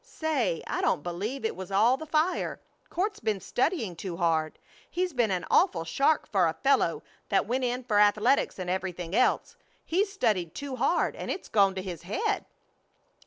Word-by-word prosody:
Say! 295 - -1
I - - -2
don't 150 - +1
believe 205 +10 -4
it 220 - -1
was 190 -1 -7
all 220 +6 +4
the 315 +4 -8
fire. 315 +4 0 0.3
Court's 410 +4 -2
been 215 - -1
studying 240 - -1
too 170 0 -6
hard. 160 -2 0 0.3
He's 360 -1 -1
been 240 -4 +2
an 185 -2 -1
awful 165 -2 +3
shark 275 - +2
for 190 -5 +2
a 160 - 0
fellow 275 - +2 0.3
that - - +2
went 255 +2 -1
in 250 +1 -2
for 215 -4 +2
athletics 210 +5 +3
and 185 -2 -5
everything 180 -1 -3
else. 255 - +1 0.3
He's 390 +5 +1
studied 210 - 0
too 280 -2 -5
hard - - +1
and - - -6
it's 375 - -4
gone 195 -2 +3
to 190 - -4
his 180 -4 -6
head!" 415 - -1
215 Hz, 180 wpm, -28 LUFS, 180-280 Hz, 0.3 s, all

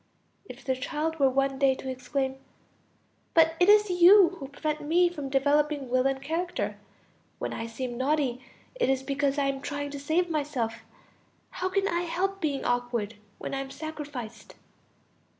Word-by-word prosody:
If 265 -6 -12
the 260 -1 +1
child 305 +4 -3
were 270 -1 +5
one 270 0 0
day 270 -1 +4
to 265 - -9
exclaim: 265 +1 -2 1.0
"But 325 -1 +6
it 360 +2 +5
is 420 -1 +6
you 360 +1 +7
who 275 - -6
prevent 305 +2 -3
me 345 +4 +3
from 290 -6 -6
developing 285 0 +1
will 255 +1 +3
and 270 0 -1
character; 330 +6 -3 0.6
when - - -4
I 230 - -4
seem 240 +1 -5
naughty, 260 -3 0 0.3
it - - 0
is 265 0 +1
because 280 +1 0
I 285 - +2
am 275 0 -1
trying 285 0 -4
to 285 - -6
save 320 +5 +1
myself; 280 -8 -2 0.7
how 370 - -2
can 395 +1 +1
I 345 +1 0
help 380 +3 -2
being 285 -4 -1
awkward 245 -3 -1 0.2
when - - -6
I 270 - -1
am 270 0 -5
sacrificed?" 290 -7 -7
280 Hz, 170 wpm, -28 LUFS, 265-320 Hz, 1.0 s, you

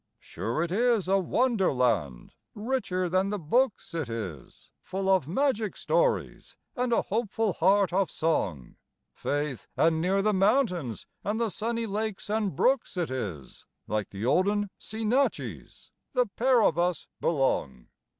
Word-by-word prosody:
Sure 120 +8 -3
it 170 - -3
is 230 -1 +2
a 195 +1 +3
wonder 225 +2 +2
land, 115 - 0 0.2
richer 210 -5 -1
than 185 +3 +1
the 210 - -1
books 215 - 0
it 160 -7 -3
is, 95 - -7
Full 190 +1 -4
of 190 -7 +3
magic 220 - 0
stories - - 0 0.2
and 250 -2 -1
a 230 - +3
hopeful 220 -1 -1
heart 190 +2 +3
of 195 -1 +2
song; 95 - -1 0.4
Faith, 145 -3 -3
and 160 0 +3
near 195 +3 +1
the 215 0 +2
mountains 190 - +1 0.2
and 210 +2 -1
the 230 -3 0
sunny 230 +2 -2
lakes 210 -1 -3
and 210 -7 0
brooks 255 - +1
it 170 -6 -1
is, 95 - -6 0.2
Like 105 0 -2
the 100 +3 -5
olden 200 +8 +2
seanichies, 225 +5 -2 0.2
the 250 -2 +3
pair 240 +3 +2
of 170 - +2
us 175 -2 0
belong. 130 - 0
190 Hz, 145 wpm, -28 LUFS, 150-225 Hz, 0.4 s, a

